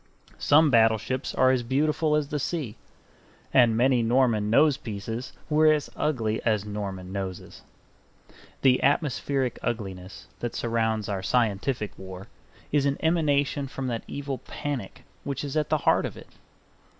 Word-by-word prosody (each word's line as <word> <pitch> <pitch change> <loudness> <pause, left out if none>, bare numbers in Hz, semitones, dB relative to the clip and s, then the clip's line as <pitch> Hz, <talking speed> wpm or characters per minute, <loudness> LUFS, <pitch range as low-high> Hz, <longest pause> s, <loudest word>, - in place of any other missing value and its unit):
Some 150 0 +5
battleships 115 +2 +2
are 130 0 +4
as 130 -2 +1
beautiful 150 +5 +1
as 150 -2 0
the 150 - -2
sea; 140 -7 -3 0.8
and 120 -3 +5
many 125 0 +3
Norman 115 -3 +2
nosepieces 120 -4 0 0.2
were 155 0 +5
as 150 -2 -1
ugly 115 -8 -1
as 105 -3 0
Norman 100 -3 -5
noses. 95 -2 -6 1.0
The 130 -2 +4
atmospheric 135 -3 0
ugliness 95 -5 -5
that 120 - -4
surrounds 110 -2 0
our 100 -2 -2
scientific 110 +1 0
war 95 0 -8 0.5
is 140 -1 +2
an 140 - 0
emanation 145 -4 +1
from 135 0 -5
that 115 -2 -2
evil 140 -2 -4
panic 140 -9 -6 0.2
which 140 -1 -4
is 140 0 -5
at 155 -1 0
the - - +3
heart - - +3
of - - -10
it. - - -13
125 Hz, 140 wpm, -26 LUFS, 110-145 Hz, 1.0 s, Some